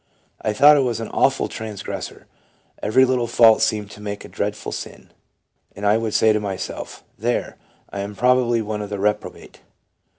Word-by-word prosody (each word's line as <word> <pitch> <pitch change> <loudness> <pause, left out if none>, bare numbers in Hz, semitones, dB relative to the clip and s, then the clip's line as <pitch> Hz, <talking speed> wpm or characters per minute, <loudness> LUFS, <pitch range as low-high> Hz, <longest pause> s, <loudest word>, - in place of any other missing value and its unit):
"I 110 - 0
thought 145 +7 +7
I - - +3
was 120 -4 0
an 115 - -5
awful - - +1
trans 110 -2 -7
gressor; - - -6 0.6
every 130 +5 +4
little 125 -2 0
fault 115 -1 +5
seemed 110 -2 0
to 105 - -12
make 105 0 -6
a - - -11
dreadful 105 +1 -4
sin; - - -8 0.6
and 100 - -6
I 105 +2 +4
would 115 -1 -2
say 110 -1 +4
to 105 - +1
myself, 100 -3 -6
' - - -41
There! 120 - -1 0.3
I 100 - -5
am 100 +1 -5
probably 125 -1 +2
one 105 0 -4
of 105 - -6
the 100 - -4
reprobate.'" 105 +2 -3
110 Hz, 190 wpm, -21 LUFS, 105-120 Hz, 0.6 s, thought